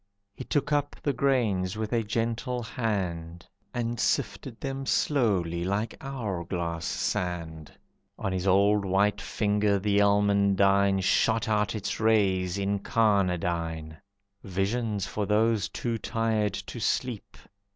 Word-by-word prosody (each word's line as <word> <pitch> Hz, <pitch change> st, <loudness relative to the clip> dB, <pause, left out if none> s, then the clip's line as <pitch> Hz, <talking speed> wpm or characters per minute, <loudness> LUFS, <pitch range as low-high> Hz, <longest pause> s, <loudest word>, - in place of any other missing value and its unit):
He -, -, -7 dB
took 145 Hz, +2 st, -1 dB
up 145 Hz, -1 st, 0 dB
the 145 Hz, -, +1 dB
grains 110 Hz, -8 st, +1 dB
with 110 Hz, +1 st, -3 dB
a 115 Hz, -, +2 dB
gentle 115 Hz, +3 st, -2 dB
hand 90 Hz, -8 st, -3 dB, 0.3 s
And 120 Hz, -1 st, -2 dB
sifted 120 Hz, -4 st, -1 dB
them 135 Hz, 0 st, -4 dB
slowly 95 Hz, -, +1 dB
like 100 Hz, +5 st, -1 dB
hour 110 Hz, -10 st, -4 dB
glass 85 Hz, -2 st, -3 dB
sand. 85 Hz, -4 st, -3 dB, 0.5 s
On 95 Hz, -, -2 dB
his 95 Hz, +1 st, -2 dB
old 100 Hz, +2 st, +4 dB
white 100 Hz, +1 st, +1 dB
finger 105 Hz, 0 st, +1 dB
the 100 Hz, +1 st, +1 dB
almandine 100 Hz, -1 st, +3 dB
Shot 110 Hz, +3 st, +2 dB
out 105 Hz, 0 st, +1 dB
its 100 Hz, -1 st, -3 dB
rays, 100 Hz, -4 st, +2 dB
incarnadine. 90 Hz, -6 st, 0 dB, 0.5 s
"Visions 100 Hz, +2 st, -1 dB
for 105 Hz, 0 st, -3 dB
those 110 Hz, -1 st, +2 dB
too 115 Hz, -2 st, -3 dB
tired 110 Hz, -2 st, 0 dB
to 100 Hz, +4 st, -7 dB
sleep. 120 Hz, 0 st, -2 dB
100 Hz, 120 wpm, -27 LUFS, 95-115 Hz, 0.5 s, old